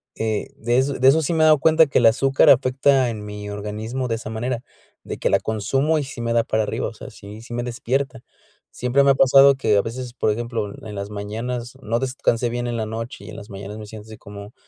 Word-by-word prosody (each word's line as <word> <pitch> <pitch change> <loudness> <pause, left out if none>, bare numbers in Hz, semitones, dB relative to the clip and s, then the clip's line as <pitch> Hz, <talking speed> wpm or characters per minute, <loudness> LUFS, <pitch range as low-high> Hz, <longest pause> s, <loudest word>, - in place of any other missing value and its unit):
eh, 110 -1 -2
de 120 +2 0
eso 135 +2 +1
de 130 0 +2
eso 150 +4 +5
sí 160 - -1
me 160 - +1
he - - +6
dado 155 -2 +5
cuenta 160 +2 +5
que 140 - 0
el 120 - +2
azúcar 135 +4 +4
afecta 130 0 +3
en 105 -2 -6
mi 105 0 -7
organismo 105 +5 -4
de 115 - -1
esa 115 -1 -7
manera, 120 +2 -3 0.4
de - - -6
que - - 0
la 100 - +4
consumo 110 +10 0
y 150 - -1
sí 135 -3 -8
me 115 0 -1
da 115 -1 +3
para 110 -1 0
arriba, 105 - -3
o - - -8
sea, - - -10
sí 105 +2 -12
si 120 - -14
me 120 - -2
despierta. 130 +2 -3 0.5
Siempre 125 +3 +1
me 140 - +4
ha - - +2
pasado 135 +1 +6
que, 110 -6 +1
a - - +4
veces, 120 +2 -6
por 120 - 0
ejemplo, 115 -2 -3 0.2
en 105 - -7
las 100 0 -5
mañanas 115 +4 -5
no 115 -1 -1
descansé 125 -2 0
bien 120 +1 -3
en 120 -1 -3
la 110 - -2
noche 115 +3 -7
y - - -10
en - - -9
las 100 - -10
mañanas 100 +2 -8
me 105 - -9
siento 105 0 -10
así 110 -1 -11
como 100 +2 -11
120 Hz, 255 wpm, -22 LUFS, 110-130 Hz, 0.5 s, he